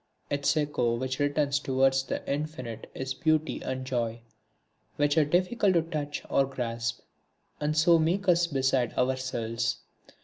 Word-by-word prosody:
Its 145 +2 +1
echo 145 -6 +1
which 130 +2 -3
returns 145 0 +1
towards 135 0 +2
the 135 - -5
Infinite 140 -6 -4
is 130 0 -3
Beauty 155 +4 0
and 130 0 -4
Joy; 120 -3 -2 0.7
which 145 0 +2
are 160 - +5
difficult 185 +5 +2
to 170 - +4
touch 150 -3 -4
or 135 - +2
grasp, 115 -3 -3 0.6
and 150 +1 -1
so 165 +1 +5
make 180 +5 0
us 175 -1 +4
beside 135 -4 0
ourselves. 125 -3 -1
140 Hz, 140 wpm, -28 LUFS, 125-155 Hz, 0.7 s, are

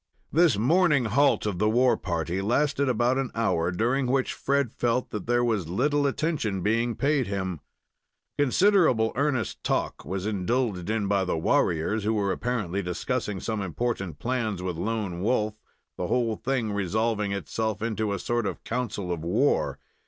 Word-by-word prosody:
This 165 - +4
morning 150 - +3
halt 140 +5 +3
of 100 -4 -2
the 105 +1 +3
war 125 +3 +4
party 85 +1 -2
lasted 140 +6 +1
about 125 +2 +2
an 135 -2 -1
hour, 90 -7 +1
during 125 +8 0
which 130 +1 +1
Fred 140 -4 0
felt 120 +1 0
that 105 -1 -5
there 120 0 +2
was 105 -9 0
little 145 - +1
attention 135 - -1
being 115 +2 +1
paid 140 -3 +1
him. 95 -4 -3 0.8
Considerable 145 - +4
earnest 135 -4 -1
talk - - -1
was 95 +6 -4
indulged 105 -2 -1
in 110 -2 0
by 100 -1 +2
the 90 -3 -1
warriors, 85 +6 +1
who 110 +2 +1
were 100 -2 +1
apparently 105 -5 -2
discussing 100 +3 -2
some 110 0 -3
important 95 -3 -3
plans 110 - -2
with 90 -2 -2
Lone 100 -1 -3
Wolf, 110 0 +1 0.4
the - - -2
whole 120 -3 +1
thing 125 -4 -1
resolving 105 +2 0
itself 110 +2 -2
into 110 -2 -1
a 100 - -1
sort 120 +2 -1
of - - -5
council 115 -6 -3
of 85 -2 -3
war. 105 +12 +1
110 Hz, 160 wpm, -26 LUFS, 100-125 Hz, 0.8 s, This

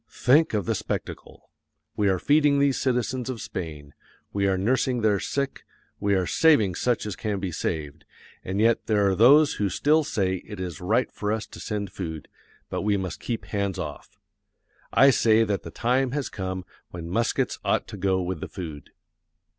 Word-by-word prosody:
Think 145 -1 +3
of 100 -4 -1
the - - +1
spectacle! - - -6 0.4
We 105 -1 +2
are 95 - +2
feeding 145 - +3
these 140 -1 +2
citizens 125 0 -1
of 125 -3 -4
Spain; 75 -7 -7 0.4
we 100 -1 +1
are 95 -1 +1
nursing 125 +4 +1
their 105 -2 +2
sick; 140 -1 -3 0.4
we 100 -1 +1
are 95 -1 +1
saving 115 - +4
such 120 +6 0
as 105 -3 -4
can 105 0 -3
be 95 -2 -3
saved, 75 -3 -4 0.4
and 95 +2 -3
yet 115 +1 +2
there 105 -2 +3
are 95 - +2
those 140 +9 +6
who 100 - +2
still 150 - +3
say 95 -8 -1
it 105 +2 -10
is 90 -4 -5
right 110 +8 +1
for 105 0 -3
us 110 0 -2
to - - -12
send 100 -3 -4
food, 80 -6 -6 0.4
but - - -3
we 105 0 +1
must 95 -3 -4
keep 115 -2 -4
hands 100 -2 -2
off. 75 -6 -7 0.7
I 135 0 +6
say 115 -2 +4
that 100 -3 -1
the - - -8
time 125 +2 0
has 145 -2 -2
come 95 -2 -5 0.2
when 85 -1 -7
muskets 115 +7 0
ought - - +1
to - - -7
go 95 -1 +1
with 90 -1 -3
the - - -5
food. 80 -7 -8
105 Hz, 185 wpm, -25 LUFS, 95-125 Hz, 0.7 s, those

